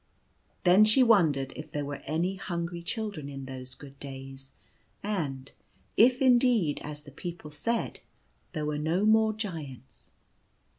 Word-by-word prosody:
Then 185 Hz, +3 st, +7 dB
she 215 Hz, +5 st, +6 dB
wondered 155 Hz, -, +3 dB
if 150 Hz, -, -8 dB
there 145 Hz, -1 st, -2 dB
were 140 Hz, 0 st, -5 dB
any 170 Hz, +6 st, 0 dB
hungry 170 Hz, -2 st, -4 dB
children 200 Hz, -, -4 dB
in 135 Hz, -1 st, -7 dB
those 130 Hz, -1 st, -7 dB
good 140 Hz, -1 st, -13 dB
days, 135 Hz, -1 st, -8 dB, 0.5 s
and 145 Hz, -10 st, -3 dB, 0.4 s
if, 255 Hz, +4 st, +5 dB
indeed, 240 Hz, -, +4 dB
as 150 Hz, 0 st, -7 dB
the 145 Hz, -, -13 dB
people 170 Hz, 0 st, -7 dB
said, 230 Hz, +10 st, -2 dB, 0.5 s
there 155 Hz, -3 st, -2 dB
were 150 Hz, 0 st, -1 dB
no 165 Hz, +6 st, +1 dB
more 220 Hz, 0 st, +5 dB
Giants. 160 Hz, -, -7 dB
160 Hz, 140 wpm, -29 LUFS, 140-210 Hz, 0.5 s, Then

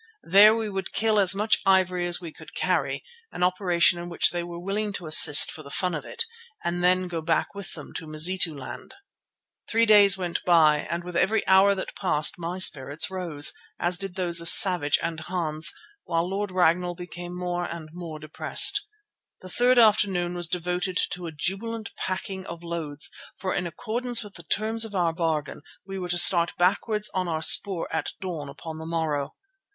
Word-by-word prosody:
There 205 Hz, +5 st, +6 dB
we 225 Hz, -1 st, -3 dB
would 195 Hz, -2 st, -6 dB
kill 220 Hz, -1 st, +1 dB
as 195 Hz, -1 st, +3 dB
much 210 Hz, +2 st, +1 dB
ivory 185 Hz, -2 st, +1 dB
as 175 Hz, -, 0 dB
we 170 Hz, -3 st, -10 dB
could -, -, -15 dB
carry, -, -, -2 dB, 0.3 s
an 180 Hz, -, -4 dB
operation 180 Hz, -1 st, +2 dB
in 175 Hz, 0 st, -7 dB
which 170 Hz, -, +2 dB
they 175 Hz, -, -3 dB
were 170 Hz, 0 st, -8 dB
willing 200 Hz, +3 st, -3 dB
to 180 Hz, -, -7 dB
assist 155 Hz, -2 st, +6 dB
for 160 Hz, -, -10 dB
the 140 Hz, -, -13 dB
fun 180 Hz, +4 st, -2 dB
of 150 Hz, -, -5 dB
it, 460 Hz, -, -3 dB, 0.4 s
and 175 Hz, +1 st, -3 dB
then 185 Hz, 0 st, +2 dB
go 170 Hz, -2 st, -5 dB
back 165 Hz, +1 st, -1 dB
with 200 Hz, -2 st, -7 dB
them 150 Hz, -, -10 dB
to 160 Hz, -, -9 dB
Mazituland. 155 Hz, -2 st, -1 dB
The -, -, -16 dB, 0.8 s
three 230 Hz, +1 st, +3 dB
days 205 Hz, -3 st, +5 dB
went 175 Hz, -2 st, -4 dB
by 160 Hz, -4 st, +4 dB
and 170 Hz, +1 st, -4 dB
with 180 Hz, 0 st, -9 dB
every 205 Hz, +5 st, +1 dB
hour 195 Hz, +1 st, +4 dB
that 190 Hz, -, -7 dB
passed 155 Hz, -2 st, +2 dB
my 175 Hz, +2 st, -5 dB
spirits 145 Hz, -3 st, 0 dB
rose, 170 Hz, -6 st, +1 dB, 0.3 s
as 175 Hz, +1 st, 0 dB
did 195 Hz, -2 st, -6 dB
those 175 Hz, -3 st, +2 dB
of 170 Hz, -, +1 dB
Savage 175 Hz, -7 st, +6 dB
and 165 Hz, -1 st, -4 dB
Hans, 160 Hz, -1 st, -2 dB, 0.3 s
while 165 Hz, 0 st, -1 dB
Lord 200 Hz, +2 st, -3 dB
Ragnall 180 Hz, -1 st, 0 dB
became 175 Hz, 0 st, -9 dB
more 175 Hz, -1 st, -3 dB
and 165 Hz, -3 st, -8 dB
more 170 Hz, -3 st, -8 dB
depressed. 155 Hz, -, +3 dB, 0.6 s
The 185 Hz, -, -11 dB
third 245 Hz, +6 st, +2 dB
afternoon 200 Hz, -6 st, +3 dB
was 175 Hz, -1 st, -3 dB
devoted 180 Hz, +2 st, -3 dB
to 180 Hz, -1 st, -6 dB
a -, -, -6 dB
jubilant 215 Hz, +8 st, -5 dB
packing 190 Hz, 0 st, -5 dB
of 170 Hz, 0 st, -9 dB
loads, 160 Hz, -4 st, -3 dB, 0.3 s
for 185 Hz, -1 st, -4 dB
in 175 Hz, -, -2 dB
accordance 235 Hz, +7 st, -2 dB
with 205 Hz, -1 st, -12 dB
the 170 Hz, -, -9 dB
terms 220 Hz, +7 st, 0 dB
of 220 Hz, -2 st, -7 dB
our 170 Hz, -3 st, 0 dB
bargain 160 Hz, -4 st, -3 dB, 0.2 s
we 195 Hz, 0 st, -7 dB
were 180 Hz, -1 st, -6 dB
to 175 Hz, -, 0 dB
start 175 Hz, -1 st, +5 dB
backwards 210 Hz, +4 st, 0 dB
on 185 Hz, -1 st, -2 dB
our 160 Hz, -1 st, -3 dB
spoor 190 Hz, -5 st, +4 dB
at 160 Hz, -, -3 dB
dawn 165 Hz, -7 st, -6 dB
upon 155 Hz, +3 st, -9 dB
the 160 Hz, -, -8 dB
morrow. 155 Hz, -4 st, -3 dB
180 Hz, 190 wpm, -24 LUFS, 165-195 Hz, 0.8 s, There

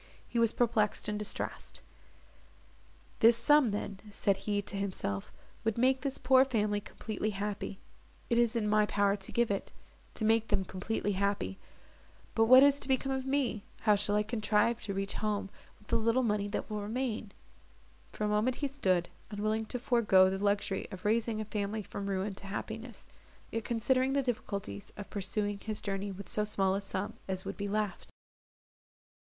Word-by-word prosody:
He 235 Hz, -, -1 dB
was 230 Hz, -1 st, +4 dB
perplexed 225 Hz, -4 st, +1 dB
and 210 Hz, 0 st, -2 dB
distressed. 210 Hz, -, -4 dB, 1.4 s
"This 230 Hz, +1 st, +7 dB
sum 285 Hz, +2 st, +5 dB
then," 200 Hz, -1 st, -4 dB
said 200 Hz, -1 st, +1 dB
he 205 Hz, +1 st, -1 dB
to 200 Hz, -, -4 dB
himself, 185 Hz, -, -3 dB, 0.3 s
"would 225 Hz, -1 st, 0 dB
make 260 Hz, +2 st, +3 dB
this 275 Hz, -2 st, -2 dB
poor 260 Hz, 0 st, +5 dB
family 210 Hz, -5 st, 0 dB
completely 215 Hz, +1 st, -4 dB
happy—it 205 Hz, +3 st, -5 dB
is 240 Hz, 0 st, +3 dB
in 220 Hz, -2 st, +1 dB
my 210 Hz, 0 st, +3 dB
power 200 Hz, -1 st, +2 dB
to 195 Hz, -, -8 dB
give 235 Hz, -2 st, +2 dB
it—to 200 Hz, +2 st, -6 dB
make 225 Hz, 0 st, +3 dB
them 195 Hz, -2 st, +1 dB
completely 205 Hz, +3 st, -2 dB
happy! 200 Hz, -, -1 dB, 0.7 s
But 225 Hz, -, +4 dB
what 255 Hz, +3 st, +9 dB
is 285 Hz, 0 st, +5 dB
to -, -, -1 dB
become 265 Hz, 0 st, +1 dB
of 265 Hz, 0 st, -2 dB
me?—how 240 Hz, -5 st, 0 dB
shall 205 Hz, 0 st, +1 dB
I 210 Hz, -, +3 dB
contrive 220 Hz, +1 st, +1 dB
to 200 Hz, -, -3 dB
reach 195 Hz, 0 st, -1 dB
home 205 Hz, -2 st, -1 dB, 0.3 s
with 210 Hz, -, -24 dB
the -, -, +3 dB
little 230 Hz, +3 st, +2 dB
money 210 Hz, -3 st, +1 dB
that 205 Hz, -, -3 dB
will 210 Hz, -1 st, -3 dB
remain?" 220 Hz, -1 st, -3 dB, 0.8 s
For -, -, -5 dB
a -, -, +2 dB
moment 210 Hz, +4 st, +2 dB
he 285 Hz, -, -1 dB
stood, 185 Hz, -11 st, +1 dB, 0.2 s
unwilling 215 Hz, +1 st, -1 dB
to 250 Hz, -, -2 dB
forego 215 Hz, -7 st, +4 dB
the 195 Hz, +1 st, -3 dB
luxury 200 Hz, -1 st, 0 dB
of 185 Hz, 0 st, -9 dB
raising 220 Hz, +1 st, +1 dB
a 215 Hz, -, -3 dB
family 210 Hz, 0 st, -2 dB
from 200 Hz, +1 st, -6 dB
ruin 195 Hz, +1 st, -1 dB
to 200 Hz, -, -7 dB
happiness, 220 Hz, +3 st, -6 dB, 0.5 s
yet 225 Hz, -1 st, -3 dB
considering 255 Hz, +3 st, +2 dB
the 280 Hz, 0 st, +2 dB
difficulties 200 Hz, -, -4 dB
of 205 Hz, -, -8 dB
pursuing 205 Hz, 0 st, -1 dB
his 215 Hz, 0 st, -3 dB
journey 200 Hz, 0 st, -3 dB
with 195 Hz, -1 st, -8 dB
so 210 Hz, -, 0 dB
small 195 Hz, -2 st, +1 dB
a 195 Hz, -, -1 dB
sum 195 Hz, 0 st, -3 dB
as 190 Hz, -1 st, -2 dB
would -, -, -4 dB
be 205 Hz, -, -3 dB
left. 210 Hz, 0 st, -2 dB
210 Hz, 175 wpm, -31 LUFS, 200-230 Hz, 1.4 s, what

